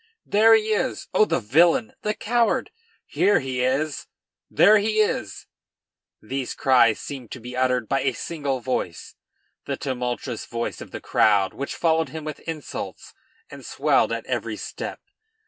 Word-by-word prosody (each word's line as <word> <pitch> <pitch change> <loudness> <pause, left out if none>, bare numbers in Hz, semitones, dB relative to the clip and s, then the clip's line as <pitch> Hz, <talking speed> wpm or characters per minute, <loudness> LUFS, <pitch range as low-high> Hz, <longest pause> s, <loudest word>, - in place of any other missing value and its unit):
"There 225 +2 +6
he 220 0 +1
is! 255 +5 -2
oh, 215 - +5
the - - 0
villain! 165 - +3
the 210 0 -1
coward! 235 +1 +1 0.3
Here 205 - +2
he 130 -3 -3
is! 140 +4 -1 0.4
There 210 +3 +6
he 215 +1 0
is!" 110 - -1 0.7
These 130 +3 -4
cries 125 -5 +4
seemed 130 -5 -7
to 130 - -8
be 125 +2 -8
uttered 125 -3 +1
by 135 - +1
a 135 - 0
single 140 -3 -3
voice, 115 -8 -3 0.5
the - - -3
tumultuous 125 -2 -4
voice 115 0 -4
of - - -9
the - - -8
crowd 100 -3 +3
which 140 - -5
followed 160 -2 +1
him 155 +2 -7
with 155 0 -6
insults 160 -2 -6 0.4
and - - -10
swelled - - +1
at - - -3
every - - -3
step. - - -6
135 Hz, 155 wpm, -24 LUFS, 125-175 Hz, 0.7 s, There